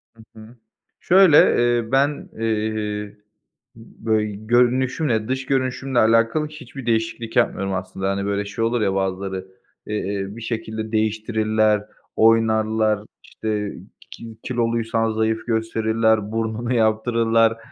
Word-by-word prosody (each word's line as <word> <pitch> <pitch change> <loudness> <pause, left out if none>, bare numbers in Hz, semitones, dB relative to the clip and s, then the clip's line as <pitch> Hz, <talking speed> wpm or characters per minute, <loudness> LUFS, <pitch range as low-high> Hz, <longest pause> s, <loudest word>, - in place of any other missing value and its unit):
Hı 110 - -16 0.2
hı. 110 +3 -14 0.4
Şöyle, 185 -4 +6 0.2
eee, 120 -1 +1
ben, 140 +2 +1
eee, 105 -2 -2 0.6
böy 110 -1 -2 0.2
görünüşümle, 125 0 +2
dış 130 +1 -2
görünüşümle 130 -1 0
alakalı 115 +7 +3
hiçbir 135 -4 -10
değişiklik 115 0 -2
yapmıyorum 100 -5 +1
aslında. 95 +1 -3
Hani, 100 0 -2
böyle, 100 0 -1
şey 115 +3 -2
olur 120 0 0
ya 95 -2 +1
bazıları, 95 0 -3 0.4
eee, 100 -2 -3
bir 115 +3 -10
şekilde 110 -1 -4
değiştirirler, 110 -1 +1 0.3
oynarlar, 110 -1 +3 0.2
işte, 105 -2 -4 0.4
ki 115 -1 -10
kiloluysan 115 -2 0
zayıf 110 +1 -1
gösterirler, 110 -1 +1
burnunu 115 +2 -2
yaptırırlar, 115 0 +2
110 Hz, 110 wpm, -22 LUFS, 110-115 Hz, 0.6 s, Şöyle